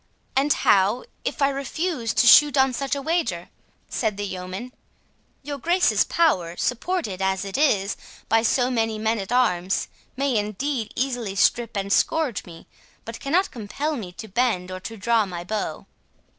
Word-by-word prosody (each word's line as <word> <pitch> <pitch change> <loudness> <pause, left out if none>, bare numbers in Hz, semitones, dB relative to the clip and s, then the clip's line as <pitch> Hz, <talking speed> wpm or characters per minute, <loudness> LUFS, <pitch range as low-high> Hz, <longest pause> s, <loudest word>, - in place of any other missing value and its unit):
"And 275 +3 +2
how 200 +1 +3 0.2
if - - -2
I 275 - +5
refuse 275 -2 -2
to - - +4
shoot 290 +4 +7
on 265 -1 +4
such 275 +3 -2
a 280 - -5
wager?" 275 - -1 0.4
said 215 -4 -2
the 205 - -3
yeoman.—"Your 200 +8 -9
Grace's 350 +6 +3
power, 180 - +1
supported, 250 - -2
as 190 0 0
it 195 - -6
is, 205 -9 +2 0.3
by 225 - +3
so 245 +2 +2
many 225 -2 0
men 220 +1 0
at 195 +2 -6
arms, 195 -7 +1 0.3
may 275 -3 +1
indeed 215 +3 -2
easily 245 -6 -2
strip 230 +2 +2
and 200 0 0
scourge 305 -10 +1
me, 165 -2 -12 0.4
but 230 0 -7
cannot 345 +8 +1
compel 275 +7 -3
me 200 -9 -6
to 220 +4 -9
bend 195 -4 0
or 185 - -5
to 225 +4 -8
draw 225 0 +2
my 175 -2 -6
bow." 210 +4 -4
230 Hz, 160 wpm, -24 LUFS, 195-275 Hz, 0.4 s, shoot